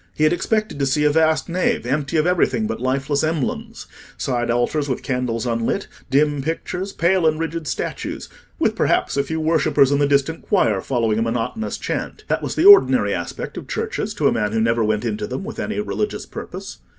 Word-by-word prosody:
He 155 - 0
had 155 +2 +4
expected 215 -3 -1
to 140 - +1
see 150 +3 +1
a 150 - +4
vast 160 0 +2
nave 175 -8 0
empty 145 +4 -1
of 155 - +2
everything 155 -10 +2
but 110 +1 -3
lifeless 135 +3 0
emblems—side 130 -4 -3
altars 120 +5 0
with 130 - -2
candles 125 -3 -2
unlit, 115 - -1 0.2
dim 145 +1 +2
pictures, 180 +5 -3
pale 175 -1 +2
and 155 0 +1
rigid 165 -1 -3
statues—with - - -4
perhaps - - +1
a 140 - +2
few 160 +3 -3
worshippers 155 -3 +3
in 140 - +2
the 145 - +3
distant 140 +3 +1
choir 110 - +1
following 115 -3 0
a - - 0
monotonous 115 - -2
chant. - - -4
That - - +1
was - - -4
the 325 - +2
ordinary 130 - +7
aspect 85 -2 -5
of - - -7
churches - - -3
to - - +2
a - - +3
man 105 0 -1
who 115 - +1
never 115 +1 +2
went 105 0 0
into 210 0 -2
them 200 - -5
with 225 +3 -7
any 215 - -2
religious 410 - -3
purpose. - - -8
145 Hz, 195 wpm, -21 LUFS, 120-165 Hz, 0.2 s, ordinary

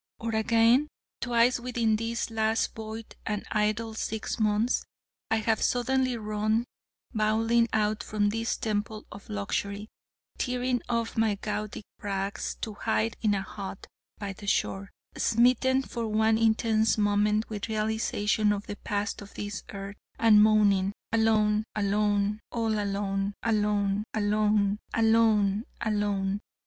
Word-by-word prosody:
Or 230 0 -3
again 230 +5 +4 0.3
twice 240 +1 +3
within 235 -3 0
these 230 +1 -2
last 220 0 0
void 220 0 -8
and 210 -1 -3
idle 215 +1 0
six 220 0 -3
months 215 +2 +2 0.5
I 225 - +3
have 220 0 +1
suddenly 255 0 +1
run, 215 +1 0 0.5
bawling 225 +2 +2
out, 215 -1 +1
from 205 -1 0
this 225 +2 -1
temple 215 0 -3
of 200 - -11
luxury, 200 - -3 0.5
tearing 250 -1 0
off 230 -1 -1
my 220 -2 +2
gaudy 210 +1 -4 0.2
rags, 195 -1 -3
to 220 - -4
hide 110 - 0
in 210 -2 +2
a 195 - -2
hut 195 -1 -7 0.3
by 200 -2 -5
the 205 +1 -11
shore, 195 0 0 0.3
smitten 250 +3 +3
for 235 -3 -4
one 220 +1 +2
intense 220 0 +2
moment 210 +1 +2
with 215 0 -5
realisation 215 -1 +1
of 205 0 -2
the 205 - -6
past 205 +1 -3
of 205 - -12
this 205 -2 -5
earth, 200 0 -7 0.2
and 220 -2 +6
moaning: 205 -2 +4 0.2
'alone, 215 -1 +3
alone... 205 0 +1
all 225 -2 0
alone, 200 0 -1
alone, 210 -2 +1
alone... 210 -1 +2 0.2
alone, 220 -2 +3 0.2
alone....' 205 -3 0
215 Hz, 130 wpm, -28 LUFS, 205-225 Hz, 0.5 s, and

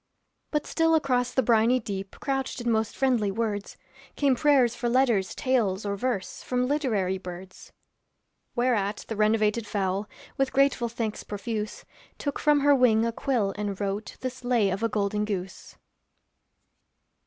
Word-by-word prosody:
But 300 -1 -1
still 325 0 +2
across 250 -5 +1
the 260 - +1
briny 230 +2 +4
deep 195 -3 -6
Couched 270 -2 -2
in 240 -1 0
most 220 -1 0
friendly 245 -6 +2
words, 205 -1 -3 0.4
Came 275 -3 +3
prayers 260 -3 +4
for 240 0 -2
letters, 235 -6 +2
tales, 220 -7 0
or 200 0 -1
verse, 195 -4 -3
From 250 0 0
literary 220 -10 0
birds. 185 0 -10 0.8
Whereat 220 -5 0
the 225 - -2
renovated 215 +1 +2
fowl 195 0 -1 0.3
With 270 -1 0
grateful 275 -3 +2
thanks 225 -2 -4
profuse, 210 +1 -5 0.3
Took 285 -1 -3
from 295 -1 +3
her 285 +1 +5
wing 235 -4 +4
a 230 - 0
quill 230 -5 0
and 205 -2 -3
wrote 200 +1 -3
This 255 0 -5
lay 235 -5 +2
of 190 +3 -3
a 230 - +1
Golden 210 0 0
Goose. 195 -3 -5
225 Hz, 150 wpm, -27 LUFS, 205-255 Hz, 0.8 s, her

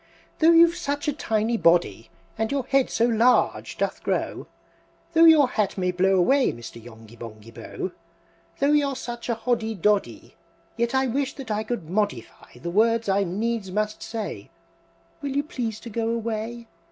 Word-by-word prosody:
"Though 320 - +5
you've 335 +1 +6
such 290 -2 -3
a 295 - +1
tiny 225 -4 0
body, 165 - +2 0.3
And 220 +3 -2
your 275 -2 -1
head 275 -1 +2
so 230 - +1
large 240 +1 +2
doth - - -2
grow, - - -2 0.7
Though 330 +1 +6
your 310 -4 +7
hat 210 -5 -1
may 180 -1 0
blow 190 +2 +2
away, 260 +10 +3
Mr. 115 -1 -10
Yonghy 115 -1 -14
Bonghy 115 -1 -11
Bò! 185 - -6 0.7
Though 280 +1 +2
you're 285 -2 +2
such 240 -1 -6
a 235 - +1
Hoddy 225 -1 -1
Doddy, 205 +2 0 0.4
Yet 235 +2 -1
I 265 0 +3
wish 265 +2 -2
that 260 -5 -7
I 210 +1 -1
could 220 -7 -4
modi 180 - 0
fy 120 - -19
the 170 +7 -5
words 230 +2 +2
I 195 +1 +2
needs 205 +3 -2
must 210 +2 -2
say! 225 -3 -6 0.7
Will 280 -2 -4
you 285 - +2
please 240 -9 -4
to 235 - -8
go 225 +1 -1
away? 230 0 -3
225 Hz, 175 wpm, -24 LUFS, 190-260 Hz, 0.7 s, your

